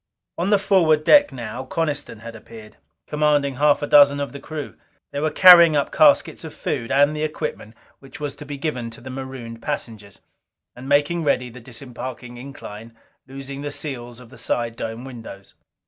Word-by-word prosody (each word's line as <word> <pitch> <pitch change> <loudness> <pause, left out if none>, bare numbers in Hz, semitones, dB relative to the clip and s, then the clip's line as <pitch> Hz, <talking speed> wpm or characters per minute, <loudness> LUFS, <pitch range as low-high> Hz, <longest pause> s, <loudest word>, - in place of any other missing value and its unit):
On 180 +3 0
the 205 - +5
forward 180 -6 +3
deck 290 - +6
now 120 0 -6
Coniston 145 -5 -3
had 115 0 -9
appeared, 110 -1 -13 0.3
commanding 145 -3 +1
half 145 +1 +3
a - - +1
dozen 145 -1 +6
of 140 -1 -3
the 140 - -9
crew. 150 0 -7 0.4
They 140 - -4
were 155 +2 0
carrying 170 -2 +8
up 145 - 0
caskets - - +3
of - - -9
food 115 - -4
and 145 +2 +3
the 150 - -4
equipment 150 -7 -5 0.2
which 135 -1 -13
was 145 -2 -4
to 150 - -10
be 145 -1 -6
given 130 -5 -3
the 120 +3 -10
marooned 130 -3 -8
passengers. 110 -8 -6 0.6
And 130 +2 -9
making 145 +4 +2
ready 125 -4 0
the 125 +1 -12
disembarking 125 0 -9
incline, 115 -4 -10 0.3
loosening 135 +1 -8
the 145 - -4
seals 120 -5 -5
of 125 -2 -14
the 135 - -13
side 120 -1 -2
dome 115 +2 -6
windows. 115 -6 -11
135 Hz, 180 wpm, -22 LUFS, 120-150 Hz, 0.6 s, carrying